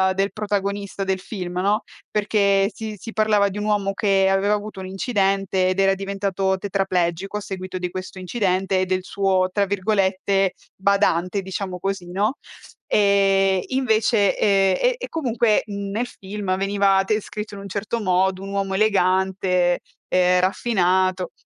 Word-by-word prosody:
del 195 +1 0
protagonista 200 -1 -2
del 190 -1 -1
film, 180 -3 -5
no, 205 +4 +1 0.3
perché 200 -1 +2
si 220 -1 -6
si 225 - -8
parlava 210 -2 +3
di 195 - -7
un 210 - -3
uomo 205 -2 0
che 195 -1 +2
aveva 195 +2 +2
avuto 210 -1 -4
un 185 - -6
incidente, 195 -2 0
ed 185 - -1
era 195 0 +4
diventato 195 -1 -1
tetraplegico 190 -1 -1
a - - -5
seguito 185 -2 -6
di 180 -1 -3
questo 185 +1 -7
incidente, 190 -1 0
e 185 - +1
del 185 0 -1
suo 190 -1 +1
tra 200 0 +1
virgolette, 195 -1 +1 0.2
"badante" 195 -1 +1
diciamo 190 -1 -5
così, 195 -1 -3
no, 210 +8 0 0.5
e 195 -2 +3
invece, 225 -5 +2
ehm, 195 -2 +3
e - - +3
e - - -6
comunque, 240 -8 +1
mhmm, 200 -1 -5
nel 230 +5 -1
film 195 -3 -4
veniva 195 0 +2
descritto 210 0 -3
in 200 - -8
un 200 - -8
certo 210 +4 -3
modo, 185 -1 +1
un 195 - -7
uomo 195 -1 -2
elegante, 190 -3 +2 0.3
ehm, 180 0 +3
raffinato. 185 -2 +1
195 Hz, 155 wpm, -22 LUFS, 185-205 Hz, 0.5 s, era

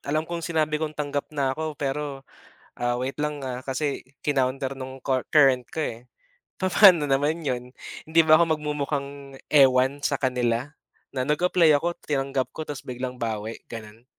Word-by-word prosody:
alam 155 +2 -1
kong 170 +1 -4
sinabi 155 -2 0
kong 155 -1 -3
tanggap 145 -1 -3
na 140 -3 -1
ako 155 +1 -4
pero, 140 -1 -3 0.6
ah, 120 0 0
wait 130 +4 -4
lang 150 -2 -2
ah, 125 -1 -4
kasi, 135 +2 -2 0.2
kinounter 135 -1 0
ng 130 0 -8
cur 130 -2 0
current 135 -5 +4
ko 160 - -4
eh." 120 0 -6 0.5
Papaano 185 -4 +6
naman 145 +3 0
'yon 125 -1 -3 0.3
hindi 160 +1 +2
ba 155 - +8
ako 170 - +5 0.2
mag-mumukhang 140 -2 -4
ewan 135 0 +4
sa 140 - 0
kanila? 125 -1 0 0.5
Na 130 - 0
nag-apply 165 +2 +3
ako 170 +3 -2
tinanggap 135 -2 -1
ko 155 - -7
tapos 145 -2 -6
biglang 125 0 -5
bawi, 110 -2 -4
gano'n? 110 +1 -9
140 Hz, 160 wpm, -25 LUFS, 130-150 Hz, 0.6 s, ba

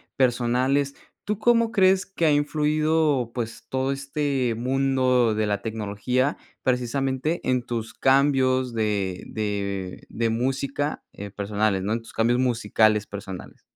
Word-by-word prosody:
personales. 130 +3 +1 0.3
¿Tú 210 0 -2
cómo 230 0 +3
crees 190 -1 +4
que 190 -4 -2
ha 155 - +5
influido, 150 -3 +1
pues, 115 -2 -5
todo 130 +1 -1
este 135 -3 -1
mundo 130 -2 +2
de 110 0 +1
la 105 -1 -1
tecnología? 115 +5 -1 0.3
Precisamente, 130 +5 0
en 125 -1 +1
tus 115 -2 -4
cambios 130 -2 +2
de 105 -5 -1
de 100 -3 -3
de 115 0 -1
música, 135 +5 -1
eh, 100 0 -8
personales, 100 -1 -1
¿no? 105 - -2
En 115 - 0
tus 115 - -14
cambios 120 +2 +2
musicales 110 -3 +2
personales. 100 -3 -8
125 Hz, 130 wpm, -24 LUFS, 110-140 Hz, 0.3 s, ha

